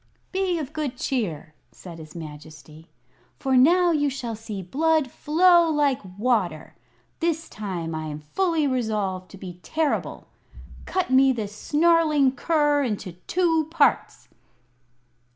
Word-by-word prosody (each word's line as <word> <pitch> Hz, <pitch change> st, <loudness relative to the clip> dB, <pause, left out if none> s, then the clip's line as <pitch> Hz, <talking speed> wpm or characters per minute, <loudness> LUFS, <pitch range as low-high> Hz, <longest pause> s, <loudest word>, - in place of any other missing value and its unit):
"Be 375 Hz, -2 st, 0 dB
of 300 Hz, -2 st, -5 dB
good 295 Hz, -5 st, -3 dB
cheer," 175 Hz, -, -3 dB, 0.2 s
said 170 Hz, -3 st, -11 dB
his 155 Hz, 0 st, -12 dB
Majesty, 155 Hz, 0 st, -11 dB, 0.5 s
"for 265 Hz, -1 st, 0 dB
now 345 Hz, +7 st, +5 dB
you 290 Hz, -3 st, +1 dB
shall 245 Hz, -4 st, -5 dB
see 215 Hz, -3 st, -7 dB
blood 305 Hz, -, +1 dB
flow 345 Hz, +2 st, +4 dB
like 290 Hz, -4 st, +1 dB, 0.2 s
water. 205 Hz, -9 st, -1 dB, 0.5 s
This 325 Hz, -1 st, -1 dB
time 180 Hz, -6 st, -5 dB
I 155 Hz, 0 st, -4 dB
am 150 Hz, 0 st, -6 dB
fully 325 Hz, -, 0 dB
resolved 210 Hz, -8 st, -2 dB
to 195 Hz, -, -12 dB
be 180 Hz, -2 st, -9 dB
terrible. 315 Hz, -, -2 dB, 0.6 s
Cut 370 Hz, -8 st, -1 dB
me 265 Hz, +1 st, +5 dB
this 210 Hz, -4 st, -4 dB
snarling 305 Hz, 0 st, +3 dB
cur 295 Hz, +1 st, +1 dB
into 210 Hz, -7 st, -3 dB, 0.2 s
two 330 Hz, -4 st, +1 dB
parts!" 320 Hz, -3 st, +1 dB
260 Hz, 130 wpm, -24 LUFS, 190-315 Hz, 0.6 s, now